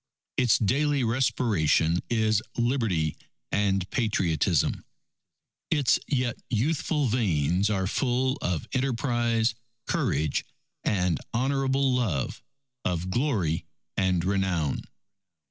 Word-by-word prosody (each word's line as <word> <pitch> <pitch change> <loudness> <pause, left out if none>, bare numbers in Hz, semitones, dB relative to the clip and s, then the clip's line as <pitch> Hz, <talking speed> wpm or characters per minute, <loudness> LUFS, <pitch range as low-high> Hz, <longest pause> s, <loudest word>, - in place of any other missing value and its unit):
Its 125 -4 +4
daily 140 +5 +1
respiration 100 - +2
is 110 -2 +2 0.2
Liberty 115 - +1 0.4
and 95 -2 +1
Patriotism. 90 - +1 0.9
Its 145 -6 +3
yet 125 -4 -1
youthful 145 +5 0
veins 95 - +1
are 95 -3 0
full 130 +5 +1
of 90 -3 -2
enterprise, 120 -3 +1 0.3
courage, 75 +1 0 0.4
and 90 -5 +1 0.2
honourable 135 +1 +1
love 105 - -1 0.4
of 90 +1 -1
glory 105 - 0 0.3
and 90 -3 +1
renown. 95 -7 0
110 Hz, 90 wpm, -27 LUFS, 90-125 Hz, 0.9 s, Its